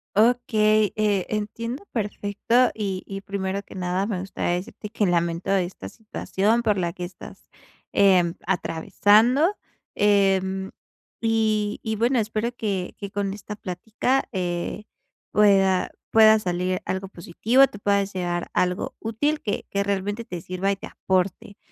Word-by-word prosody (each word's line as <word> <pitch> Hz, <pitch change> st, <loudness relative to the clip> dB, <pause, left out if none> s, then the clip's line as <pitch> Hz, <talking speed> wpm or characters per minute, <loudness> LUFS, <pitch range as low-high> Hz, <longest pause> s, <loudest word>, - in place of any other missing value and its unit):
Okey, 215 Hz, -2 st, +3 dB
eh, 205 Hz, -3 st, +1 dB
entiendo 230 Hz, -, -4 dB
perfecto 215 Hz, +3 st, +1 dB
y 195 Hz, -3 st, -3 dB
y 195 Hz, 0 st, -6 dB
primero 195 Hz, 0 st, -3 dB
que 200 Hz, -, -14 dB
nada, 185 Hz, +2 st, -1 dB
me 195 Hz, -5 st, -2 dB
gustaría 185 Hz, -2 st, -2 dB
decirte 205 Hz, +3 st, -7 dB
que 215 Hz, -2 st, 0 dB
lamento 170 Hz, +1 st, 0 dB
esta 180 Hz, -, -1 dB
situación 220 Hz, -, -1 dB
por 210 Hz, -3 st, +2 dB
la 170 Hz, -2 st, 0 dB
que 180 Hz, -, -7 dB
estás, 175 Hz, -, -10 dB, 0.5 s
em, 185 Hz, -4 st, +4 dB
atravesando, 210 Hz, -, +3 dB, 0.4 s
eh, 200 Hz, -2 st, +4 dB, 0.8 s
y 215 Hz, -2 st, +1 dB
y 220 Hz, 0 st, -2 dB
bueno 240 Hz, +2 st, +2 dB
espero 220 Hz, +2 st, -1 dB
que 195 Hz, -6 st, -3 dB
que 200 Hz, -1 st, -7 dB
con 200 Hz, -1 st, -2 dB
esta 210 Hz, +1 st, -8 dB
plática, 215 Hz, +7 st, -1 dB
eh, 180 Hz, +2 st, -3 dB, 0.5 s
pueda 195 Hz, -3 st, +4 dB, 0.2 s
pueda 220 Hz, -1 st, +7 dB
salir 180 Hz, -1 st, -1 dB
algo 190 Hz, 0 st, -3 dB
positivo, 220 Hz, +10 st, +3 dB
te 205 Hz, -, -11 dB
puedas 200 Hz, -1 st, +1 dB
llevar 175 Hz, -2 st, -2 dB
algo 180 Hz, +1 st, 0 dB
útil 290 Hz, +8 st, -1 dB
que 205 Hz, -, -3 dB
que 200 Hz, 0 st, 0 dB
realmente 200 Hz, +3 st, -2 dB
te 175 Hz, -2 st, -6 dB
sirva 185 Hz, +3 st, -1 dB
y 195 Hz, -, -2 dB
te -, -, -8 dB
aporte, 190 Hz, +2 st, -2 dB
200 Hz, 140 wpm, -24 LUFS, 185-215 Hz, 0.8 s, pueda